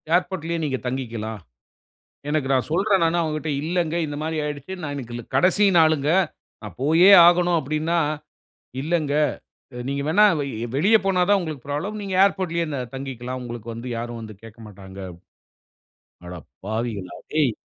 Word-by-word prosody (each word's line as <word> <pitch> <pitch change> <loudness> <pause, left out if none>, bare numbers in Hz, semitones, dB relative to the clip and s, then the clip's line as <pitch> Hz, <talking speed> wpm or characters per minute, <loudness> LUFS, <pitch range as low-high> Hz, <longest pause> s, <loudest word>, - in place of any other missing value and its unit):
"ஏர்போர்ட்லேயே 175 -2 -1
நீங்க 135 -3 -1
தங்கிக்கிலாம்." 115 -4 -4 0.9
எனக்கு 150 -3 0
நான் 130 -2 +1
சொல்றேன் 195 +1 +2
நானு 165 +1 +1
அவங்கள்ட 155 -1 -3
இல்லங்க, 170 0 -1
இந்த 145 - -5
மாரி 160 +1 -2
ஆயிருச்சு. 150 +4 -5
"நான் 145 -2 -4
இன்னைக்கு 120 -4 -6
கடைசி 185 +8 +4
நாளுங்க. 155 -2 +3 0.5
நான் 105 -5 -9
போயே 165 +7 +6 0.2
ஆகணும்" 175 0 +4
அப்படினா, 155 +4 -1 0.8
"இல்லங்க. 155 -2 0 0.8
"நீங்க 140 0 -2
வேணா 200 +7 +5 0.5
வெளிய 205 +8 +5
போனா 190 -2 +2
தான் 205 -1 +5
உங்களுக்கு 155 -7 -6
ப்ராப்ளம். 195 +9 -3
நீங்க 195 -2 -5
ஏர்போர்ட்லயே 180 -4 0 0.3
தங்கிக்கிலாம். 130 -1 -5
உங்களுக்கு 120 -2 -7
வந்து 115 +2 -7
யாரும் 120 0 -5
வந்து 110 -2 -9
கேக்கமாட்டாங்க." 105 -4 -12 1.3
அடப்பாவிகளா 100 +4 -6 0.2
டேய், 150 -4 +3
150 Hz, 130 wpm, -23 LUFS, 120-170 Hz, 1.3 s, போயே